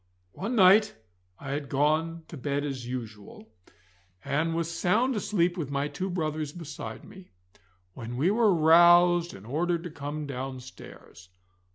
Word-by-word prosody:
One 225 +6 -4
night 210 +1 +5 0.4
I 140 - -7
had 140 -1 -4
gone 155 +4 0
to - - -8
bed 145 +1 -2
as 130 -4 -5
usual, 120 - -8 0.7
and 165 +3 -1
was 170 0 -2
sound 220 +10 +1
asleep 180 -4 0
with 155 -6 -4
my 140 +1 -1
two 190 +5 -4
brothers 155 -4 -3
beside 145 -9 -8
me, 190 -1 -14 0.6
when 120 +4 -7
we 165 +9 +2
were 220 -1 +3
roused 175 +1 +5
and 95 - -13
ordered 165 +6 -1
to 175 - -7
come 145 +1 -6
downstairs. 130 - -9
160 Hz, 145 wpm, -27 LUFS, 140-175 Hz, 0.7 s, night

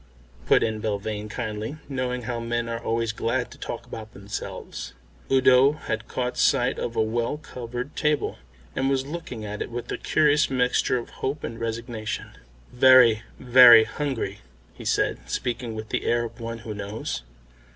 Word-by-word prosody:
put - - +5
in 110 -1 -1
Belvane 105 0 -3
kindly, 110 +4 -4
knowing 125 -2 -2
how 120 0 -3
men 120 0 -2
are 115 0 -3
always 115 -1 0
glad 120 +2 -1
to - - -13
talk - - -5
about 110 -1 -9
themselves. 100 +1 -7 0.4
Udo 130 +1 +6
had 110 -6 -4
caught 125 -1 -3
sight - - +3
of 115 - -3
a 110 - +2
well 115 +5 -1
covered 125 -2 -7
table, 150 - 0 0.4
and 135 +1 +1
was 135 -1 +1
looking 140 -8 -6
at 105 0 -5
it - - -3
with 120 0 -6
a - - -3
curious 150 0 +3
mixture 125 -1 +2
of 120 - -6
hope 140 +3 -2
and 115 0 -5
resignation. 115 -1 -4 0.4
"Very, 125 -3 +7 0.2
very 125 -2 +9
hungry," 130 -7 -3 0.3
he - - -11
said, - - 0
speaking 120 -2 -3
with 110 0 -6
the - - -1
air 120 0 +2
of 115 +1 -7
one 115 0 -5
who 110 - -4
knows. 100 - -4
120 Hz, 165 wpm, -25 LUFS, 110-130 Hz, 0.4 s, very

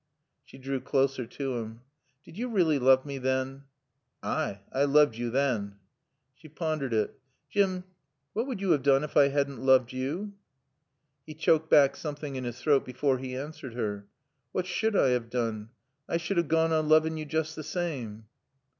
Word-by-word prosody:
She - - -15
drew 135 0 -3
closer 135 -3 0
to 135 -1 -3
him. 115 0 -7 0.4
"Did - - -14
you 245 +5 -3
really 170 -9 +2
love 130 +1 +5
me 140 -1 -5
then?" 130 +1 -2 0.6
"Ay 100 0 -2
I 140 +2 +3
looved 145 -3 +4
yo 120 +1 -3
than." 115 -6 0 0.6
She 155 +4 -16
pondered 155 -4 -2
it. 110 -2 -1 0.3
"Jim 190 -3 +1 0.5
what 230 +4 -1
would 240 -8 -4
you 195 -3 +1
have 145 - +3
done 135 +1 +4
if 150 - -6
I 140 - +7
hadn't 140 -2 -1
loved 130 -2 +4
you?" 155 +11 -3 0.9
He 155 - -8
choked 160 0 +2
back 140 -2 +6
something 150 -2 -5
in 130 -1 -4
his 120 +1 -5
throat 140 +1 +3
before 130 +1 0
he 130 0 -5
answered 135 -3 -7
her. 105 -4 -3 0.5
"What 185 - -1
sud 215 +4 0
I 135 - +4
have 125 -2 0
doon? 115 -3 -2 0.4
I - - +1
sud 170 +3 -3
have 170 -2 +2
goan 165 +1 +2
on 155 -1 +1
looving 155 +1 +4
yo 155 - -4
joost 160 +1 -2
the - - -5
saame. 135 - -4
140 Hz, 180 wpm, -28 LUFS, 130-160 Hz, 0.9 s, I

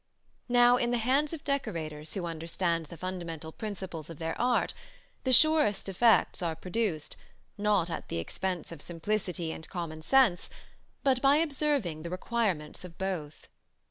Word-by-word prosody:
Now, 245 0 +6
in 240 -1 0
the 245 - +1
hands 270 +6 +2
of 325 -4 -6
decorators 160 - -3
who 185 -3 -2
understand 165 0 -1
the 170 - -10
fundamental 170 -3 -5
principles 185 -6 -6
of 165 - -8
their 165 +1 -3
art, 245 0 +2 0.5
the 260 - +2
surest 295 -7 +5
effects 220 +2 +3
are 165 -2 -1
produced, 180 -2 -2 0.4
not 205 -4 +2
at - - -5
the - - -2
expense 175 - -3
of 165 -4 -9
simplicity 175 -1 -2
and 160 - -8
common 165 -3 -5
sense, 240 -1 +3 0.5
but 260 -2 +3
by 275 +1 +6
observing 285 - 0
the 170 - -5
requirements 185 -5 -2
of 175 -2 -11
both. 180 -6 -4
185 Hz, 150 wpm, -30 LUFS, 165-240 Hz, 0.5 s, Now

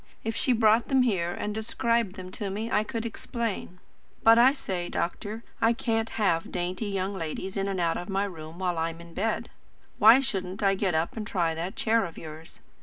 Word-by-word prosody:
If 225 0 -2
she 260 - +2
brought 225 -1 +4
them 265 -2 +4
here 185 -8 +1
and 210 +4 -3
described 225 -1 0
them 185 -2 -8
to 200 +1 -4
me 215 +4 -4
I 210 - +3
could 230 0 -4
explain 230 -5 -4 0.5
But, 225 +1 +7
I 250 +3 +7
say, 185 -10 -4
doctor. 210 +6 -3 0.2
I 225 +1 +5
can't 225 -2 -1
have 175 -6 +1
dainty 180 +4 -2
young 195 0 -2
ladies 185 +2 -4
in 195 0 -1
and 195 -2 -2
out 170 -1 +1
of 175 - -6
my 195 +1 +1
room 160 -3 -8
while 180 -2 -1
I'm 165 0 -2
in 170 0 -12
bed. 220 +6 -1 0.5
Why 225 +5 +9
shouldn't 195 -7 -3
I 195 -1 +4
get 190 -3 0
up 160 +1 0
and 215 -2 -4
try 170 -5 0
that 175 +6 -4
chair 225 0 +2
of 170 - -9
yours? 160 0 -9
195 Hz, 205 wpm, -27 LUFS, 175-225 Hz, 0.5 s, Why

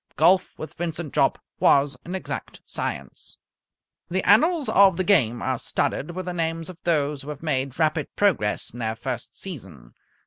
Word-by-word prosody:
Golf 185 +1 +3
with 155 - -7
Vincent 165 -3 -4
Jopp - - +3 0.2
was 140 0 +4
an 180 +3 -4
exact 190 - -6
science. - - -5 0.7
The 185 +2 -1
annals 310 - +4
of 195 -3 +5
the 185 - +1
game 130 - +3
are - - -1
studded 170 +4 -2
with 185 -1 -4
the 180 - -3
names 165 0 -2
of 180 -2 -10
those 150 -4 +1
who 145 - -9
have 150 +1 -7
made 135 -4 -1
rapid 155 -2 +1
progress 145 - +1
in 120 - -9
their 110 -1 -2
first 120 0 -5
season. 95 - -9
160 Hz, 170 wpm, -24 LUFS, 135-185 Hz, 0.7 s, of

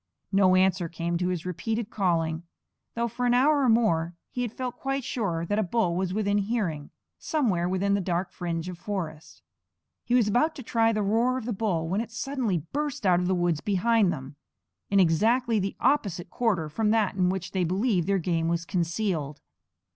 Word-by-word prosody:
No 190 -2 +4
answer 185 -2 +2
came 170 +1 -3
to 180 - 0
his 180 -2 -2
repeated 205 +5 -3
calling, 165 -5 0 0.5
though 235 0 0
for 245 +2 -2
an 245 - +3
hour 285 +3 +4
or 260 - +3
more 175 -8 +2 0.2
he 250 - -3
had 240 -3 -2
felt 250 0 -5
quite 270 0 -2
sure 195 -10 -2
that 205 +5 0
a - - +2
bull 185 -2 0
was 185 0 -1
within 205 0 +1
hearing, 195 -9 -2 0.3
somewhere 200 - 0
within 195 +2 +1
the 200 - +1
dark 180 0 -2
fringe 170 -1 -4
of 180 -2 -7
forest. 170 -5 -6 0.6
He 245 - +1
was 240 -4 +4
about 300 +10 +2
to 270 - -8
try 225 0 +2
the 215 -2 0
roar 230 +5 +2
of 250 - -5
the 240 - -2
bull, 190 -6 -1
when 195 +6 0
it 230 - -6
suddenly 230 - -2
burst 290 -6 -2
out 180 -2 +4
of 180 - -1
the 185 - +2
woods 175 -3 0
behind 205 +1 +2
them, 135 0 -7 0.5
in 200 - +3
exactly 220 +7 +3
the 195 0 -2
opposite 195 - 0
quarter 200 -10 0
from 210 +8 0
that 215 -3 +2
in 180 -2 +1
which 190 -1 -3
they 190 -2 0
believed 185 0 +1
their 200 0 +2
game 165 -2 0
was 170 0 -1
concealed. 170 -5 -2
195 Hz, 200 wpm, -27 LUFS, 175-230 Hz, 0.6 s, No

